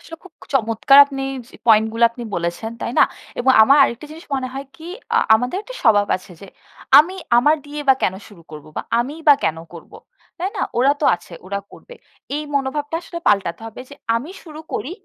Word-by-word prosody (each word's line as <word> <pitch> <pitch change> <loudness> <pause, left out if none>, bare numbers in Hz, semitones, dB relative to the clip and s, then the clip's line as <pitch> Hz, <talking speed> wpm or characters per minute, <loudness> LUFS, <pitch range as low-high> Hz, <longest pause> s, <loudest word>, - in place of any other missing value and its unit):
আসলে 330 -1 -11
খুব - - -15 0.2
চমৎকার 230 +3 +4
আপনি 275 -1 -6 0.3
স - - -25
পয়েন্ট 220 -1 +5
গুলো 230 +1 +2
আপনি 240 +1 -10
বলেছেন, 175 +6 -3
তাই 235 - -4
না? - - +8 0.3
এবং 260 +2 +3
আমার 275 +6 +5
আরেকটা 255 +2 -1
জিনিস 325 +2 -12
মনে 260 -1 -3
হয় 270 +1 -5
কি 320 - -14 0.3
আ - - +4 0.2
আমাদের 245 +8 -1
একটা - - -11
স্বভাব 205 -4 +4
আছে 185 0 -15
যে, 200 - -11 0.5
আমি 330 +6 +3 0.2
আমার 295 +6 +3
দিয়ে 295 +1 -6
বা 270 - +7
কেন 185 - +1
শুরু 195 -6 -17
করব 150 -2 -10
বা - - -2 0.2
আমিই 280 +7 -3
বা 290 - +9
কেন 160 - -1 0.2
করব। 170 - -13 0.5
তাই 360 +3 -2
না? - - -2 0.2
ওরা 265 +3 +4
তো - - -1
আছে, 175 - -18
ওরা 200 +1 -3
করবে। - - -14 0.4
এই 300 - -3
মনোভাবটা 285 +3 -2
আসলে 340 0 -7
পাল্টাতে 195 -5 +1
হবে 225 - -10
যে, - - -10 0.2
আমি 265 +9 -6
শুরু 310 -2 -11
করি 275 - -4
255 Hz, 205 wpm, -19 LUFS, 215-295 Hz, 0.5 s, বা